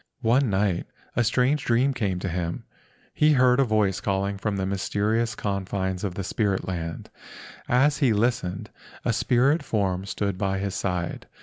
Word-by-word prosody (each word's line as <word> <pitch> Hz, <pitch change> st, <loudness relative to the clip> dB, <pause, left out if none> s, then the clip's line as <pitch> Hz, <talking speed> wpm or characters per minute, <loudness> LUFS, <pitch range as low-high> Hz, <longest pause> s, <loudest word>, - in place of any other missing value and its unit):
One 125 Hz, +3 st, +3 dB
night 95 Hz, -2 st, 0 dB, 0.3 s
a 120 Hz, -, +3 dB
strange 130 Hz, +5 st, +2 dB
dream 125 Hz, +4 st, +2 dB
came 100 Hz, -7 st, -1 dB
to -, -, -2 dB
him. 85 Hz, -1 st, -3 dB, 0.5 s
He 150 Hz, 0 st, +4 dB
heard 125 Hz, -1 st, +4 dB
a -, -, +6 dB
voice 110 Hz, -5 st, +1 dB
calling 100 Hz, 0 st, -1 dB
from 105 Hz, -1 st, -1 dB
the 95 Hz, -, -1 dB
mysterious 105 Hz, +4 st, 0 dB
con¬ 100 Hz, -3 st, -3 dB
fines 95 Hz, -1 st, -2 dB
of 95 Hz, -4 st, -3 dB
the 100 Hz, -, -3 dB
spirit 100 Hz, 0 st, -1 dB
land. 85 Hz, -3 st, -5 dB, 0.6 s
As 140 Hz, +3 st, +3 dB
he 135 Hz, -5 st, +4 dB
listened, 105 Hz, -4 st, -1 dB, 0.3 s
a -, -, +2 dB
spirit 135 Hz, +6 st, +2 dB
form 95 Hz, -3 st, -1 dB
stood 100 Hz, -2 st, -2 dB
by 95 Hz, -1 st, 0 dB
his 100 Hz, 0 st, -2 dB
side. 90 Hz, -2 st, -3 dB
100 Hz, 170 wpm, -25 LUFS, 95-120 Hz, 0.6 s, a